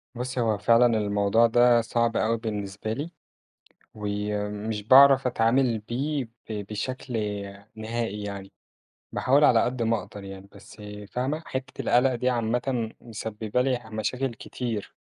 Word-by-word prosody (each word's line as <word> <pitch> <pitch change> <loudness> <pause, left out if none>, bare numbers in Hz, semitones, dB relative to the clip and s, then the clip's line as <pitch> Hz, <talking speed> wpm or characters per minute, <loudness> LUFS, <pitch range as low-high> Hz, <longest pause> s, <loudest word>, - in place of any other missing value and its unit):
بُصّي 125 +1 -4
هو 110 -3 +1
فعلًا 115 +4 +5
الموضوع 105 +2 +3
ده 120 0 +5
صعب 115 0 0
أوي 115 +1 +1
بالنسبة 105 -1 -4
لي، 145 +8 -5 0.8
وي 105 0 -3
مش 105 0 -4
باعرف 135 +3 +7
أتعامل 120 0 +2
بيه 135 +6 -2
ب 110 -3 -8
بشكل 130 +4 -5 0.6
نهائي 110 -1 -3
يعني، 100 -1 -7 0.6
باحاول 140 +3 +3
على 115 -5 +5
قد 125 -1 -2
ما 115 0 +2
أقدر 100 -1 -11
يعني 95 0 -10
بس، - - -15 0.3
فاهمة؟ 140 +6 -2
حتّة 130 0 -5
القلق 125 +1 +3
دي 125 +1 0
عامةً 120 0 -1
مسببة 110 +1 -3
لي 125 -2 0
مشاكل 125 +3 -2
كتير. 115 -1 -5
115 Hz, 135 wpm, -26 LUFS, 105-125 Hz, 0.8 s, باعرف